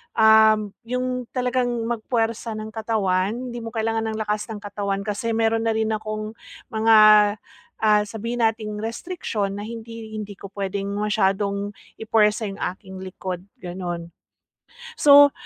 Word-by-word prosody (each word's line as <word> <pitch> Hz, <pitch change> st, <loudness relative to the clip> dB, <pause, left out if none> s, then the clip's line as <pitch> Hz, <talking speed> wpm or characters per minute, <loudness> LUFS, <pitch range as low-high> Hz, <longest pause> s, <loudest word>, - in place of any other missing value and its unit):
um, 220 Hz, 0 st, +6 dB, 0.3 s
'yung 250 Hz, +1 st, -2 dB
talagang 245 Hz, -2 st, 0 dB
mag-puwersa 230 Hz, -1 st, -1 dB
ng 215 Hz, 0 st, -6 dB
katawan. 210 Hz, -3 st, 0 dB, 0.2 s
Hindi 240 Hz, 0 st, -5 dB
mo 225 Hz, -, -7 dB
kailangan 225 Hz, -1 st, -1 dB
ng 215 Hz, -, -4 dB
lakas 210 Hz, 0 st, -2 dB
ng 220 Hz, -3 st, -7 dB
katawan 200 Hz, -1 st, -3 dB
kasi 210 Hz, +3 st, -2 dB
meron 225 Hz, 0 st, +1 dB
na 225 Hz, -, +2 dB
rin 220 Hz, 0 st, +1 dB
akong, 215 Hz, 0 st, -3 dB, 0.4 s
mga, 220 Hz, 0 st, +4 dB, 0.9 s
ah, 210 Hz, -1 st, +5 dB
sabihin 230 Hz, +3 st, -4 dB
nating 215 Hz, -1 st, -1 dB
restriction 225 Hz, -, -3 dB
na 205 Hz, -, -5 dB
hindi 230 Hz, -1 st, -8 dB
hindi 210 Hz, -1 st, -5 dB
ko 200 Hz, -, -9 dB
puwedeng 200 Hz, 0 st, -3 dB
masyadong 205 Hz, -1 st, 0 dB, 0.3 s
ipuwersa 220 Hz, 0 st, +2 dB
'yung 195 Hz, 0 st, -7 dB
aking 190 Hz, 0 st, -11 dB
likod, 185 Hz, -1 st, -5 dB, 0.2 s
gano'n. 175 Hz, -2 st, -5 dB, 0.9 s
So, 285 Hz, -4 st, +8 dB
220 Hz, 135 wpm, -23 LUFS, 205-225 Hz, 0.9 s, So